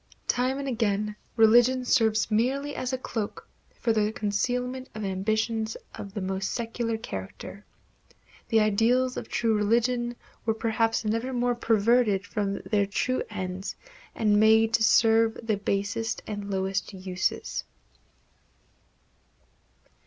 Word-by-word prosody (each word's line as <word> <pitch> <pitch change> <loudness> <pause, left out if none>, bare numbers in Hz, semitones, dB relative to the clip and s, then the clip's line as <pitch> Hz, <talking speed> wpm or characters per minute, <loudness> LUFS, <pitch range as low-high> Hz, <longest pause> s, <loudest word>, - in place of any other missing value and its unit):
Time 255 +2 +1
and 280 0 -4
again 210 -4 0 0.2
religion 240 +3 +5
serves 220 -2 +2
merely 270 +6 0
as 255 - -3
a 260 - -1
cloak 225 -4 -5 0.3
for 230 - +1
the 215 -1 +1
concealment 250 +4 -2
of 215 -1 -4
ambitions 220 +3 -1 0.2
of 200 0 -9
the 205 - -2
most 190 0 -2
secular 230 -1 -2
character. 95 - -7 0.9
The 225 -1 +4
ideals 235 +5 +2
of - - -6
true 230 -2 +1
religion 240 +3 +1 0.3
were 225 -1 0
perhaps 225 0 0
never 230 +4 -1
more 245 0 +1
perverted 225 -3 +2
from 200 -2 -2
their 205 -2 +3
true 255 +5 0
ends 190 -2 -5 0.4
and 210 -2 +3
made 220 +1 +5
to 230 - +3
serve 225 0 +4
the 220 -2 +1
basest 205 +4 -2
and 205 -1 -5
lowest 190 0 -1
uses. 185 -1 -2
220 Hz, 125 wpm, -27 LUFS, 205-240 Hz, 0.9 s, religion